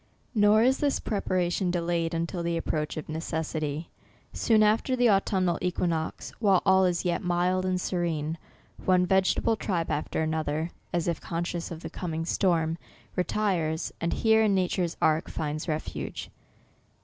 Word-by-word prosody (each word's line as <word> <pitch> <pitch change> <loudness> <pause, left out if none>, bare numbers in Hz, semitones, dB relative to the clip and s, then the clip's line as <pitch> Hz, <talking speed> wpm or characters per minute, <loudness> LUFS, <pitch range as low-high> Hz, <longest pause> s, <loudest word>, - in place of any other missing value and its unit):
Nor 215 0 +5
is 260 +2 +3
this 285 -2 +1
preparation 185 -3 0
delayed 170 -1 0
until 170 +2 -2
the 170 0 -1
approach 155 -2 -2
of 155 - -5
necessity. 155 -1 -3 0.4
Soon 220 -2 +3
after 220 +5 +2
the 245 -2 +4
au 195 -2 +6
tumnal 185 -4 0
equinox, 170 -3 -2
while 200 -5 +3
all 190 -1 +5
is 175 0 0
yet 175 - 0
mild 180 +1 +1
and 185 0 0
se 180 - -3
rene, 160 -3 -1 0.5
one 180 -1 +4
vegetable 190 +4 +2
tribe 180 -6 -2
after 150 +1 -1
another, 155 +1 -1 0.2
as 175 -1 -1
if 170 -2 -1
conscious 170 0 -3
of 165 -1 -7
the - - -6
coming 165 -2 -3
storm, 165 -3 +1 0.4
retires, 180 -4 0
and 170 - 0
here, 220 -1 +4
in 210 -3 +3
nature's 180 -2 0
ark, 155 +1 +2
finds 155 0 -3
refuge. 155 -1 -4
175 Hz, 155 wpm, -27 LUFS, 160-190 Hz, 0.5 s, au